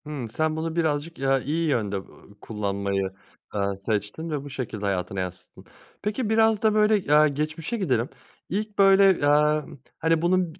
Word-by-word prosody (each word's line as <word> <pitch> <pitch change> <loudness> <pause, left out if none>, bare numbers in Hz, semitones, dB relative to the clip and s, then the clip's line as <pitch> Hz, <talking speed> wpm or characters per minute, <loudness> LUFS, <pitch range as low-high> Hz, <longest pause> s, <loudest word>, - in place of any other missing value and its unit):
Hımm. 140 -6 -5
Sen 155 +7 -1
bunu 160 +1 -3
birazcık, 160 0 -1
ya, 135 0 +2
iyi 155 +5 -1
yönde, 105 -7 0
ııı, 100 +1 -10
kullanmayı, 100 -2 -2 0.5
eee, 100 -1 -1
seçtin 110 +9 -2
ve 150 -3 -3
bu 145 - -8
şekilde 115 -6 -5
hayatına 95 -1 -2
yansıttın. 90 0 -7 0.4
Peki 210 +2 -2
biraz 220 -1 +3
da 220 -1 +3
böyle, 210 -7 +3
aaa, 150 +1 +7
geçmişe 155 +8 -3
gidelim. 130 - 0 0.4
İlk 210 +2 -3
böyle 195 -5 +5
aaa, 150 0 +3 0.3
hani, 165 0 +2
bunun 175 -1 +1
bi - - -22
150 Hz, 165 wpm, -25 LUFS, 110-175 Hz, 0.5 s, aaa